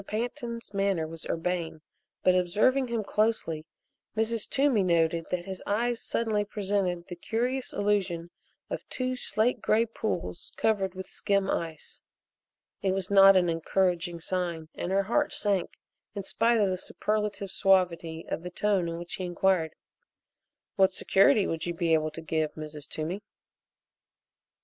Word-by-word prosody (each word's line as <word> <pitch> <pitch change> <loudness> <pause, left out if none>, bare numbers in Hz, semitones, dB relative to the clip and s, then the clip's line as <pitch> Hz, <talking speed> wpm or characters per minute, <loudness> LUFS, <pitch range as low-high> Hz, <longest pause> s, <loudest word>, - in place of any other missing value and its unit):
Pantin's 235 0 -4
manner 195 -4 +1
was 165 0 -8
urbane 165 -1 -2 0.4
but, 185 - +5
observing 210 +9 +2
him 235 -2 -1
closely, 195 -8 0 0.5
Mrs. 225 0 0
Toomey 270 -6 +3
noted 165 -2 +2
that 175 -1 -2
his 190 -1 -6
eyes 235 +3 0
suddenly 220 -3 0
presented 195 -4 -1
the 175 - -7
curious 245 +7 -1
illusion 190 -5 0 0.4
of - - -4
two 255 0 -2
slate 240 -1 0
gray 225 +2 +3
pools 215 -6 -4
covered 195 -4 +1
with 190 0 -6
skim 195 -1 0
ice. 165 -3 -4 0.8
It 190 -1 +1
was 190 0 -3
not 195 -1 +8
an 180 -1 +3
encouraging 175 +1 0
sign 170 -3 -2
and 175 - -4
her 195 +1 +3
heart 295 +9 +1
sank 205 -10 +1 0.5
in 200 - -3
spite 230 +4 +2
of 200 -3 +3
the 185 - -2
superlative 210 -1 -2
suavity 170 -4 +2
of - - -3
the 180 - -6
tone 190 -2 +1
in 165 - -4
which 175 0 -7
he 190 - -4
inquired: 175 -2 +1 1.0
"What 190 -1 +4
security 195 +2 +4
would 165 +1 -2
you 170 - -2
be 165 -1 +1
able 155 -1 +2
to 155 +2 -8
give, 155 -1 -1
Mrs. 150 -2 -7
Toomey?" 165 +6 -3
190 Hz, 150 wpm, -28 LUFS, 170-215 Hz, 1.0 s, not